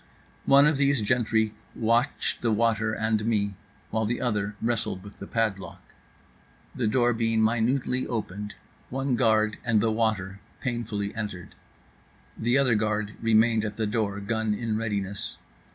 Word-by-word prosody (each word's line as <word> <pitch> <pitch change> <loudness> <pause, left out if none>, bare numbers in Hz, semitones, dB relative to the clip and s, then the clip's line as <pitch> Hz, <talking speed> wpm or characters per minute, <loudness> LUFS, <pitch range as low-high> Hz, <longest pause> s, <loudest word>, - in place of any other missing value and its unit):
One 140 +1 +7
of 150 -1 +3
these 140 -4 +2
gentry 110 -1 +1 0.2
watched 115 +5 +1
the 115 - +1
water 115 0 +2
and 110 -1 0
me, 105 -3 0 0.4
while 110 0 0
the 120 - -1
other 105 -3 -1
wrestled 115 -5 -1
with 100 0 -12
the 100 - -7
padlock. 110 -4 -3 0.8
The 120 - -1
door 120 +2 +3
being 115 -1 +1
minutely 125 +3 +1
opened, 105 -3 -4 0.3
one 135 0 -1
guard 110 -3 +2
and 115 -3 +3
the 110 +1 +2
water 105 -4 -1 0.2
painfully 115 -5 -3
entered. 105 -6 -6 0.8
The 120 +3 +1
other 135 -3 +3
guard 105 -1 0
remained 115 0 +4
at 105 -1 -4
the 110 - 0
door, 105 -2 -1
gun 110 +1 -1
in 115 -1 -2
readiness. 100 -3 -3
110 Hz, 145 wpm, -27 LUFS, 105-120 Hz, 0.8 s, One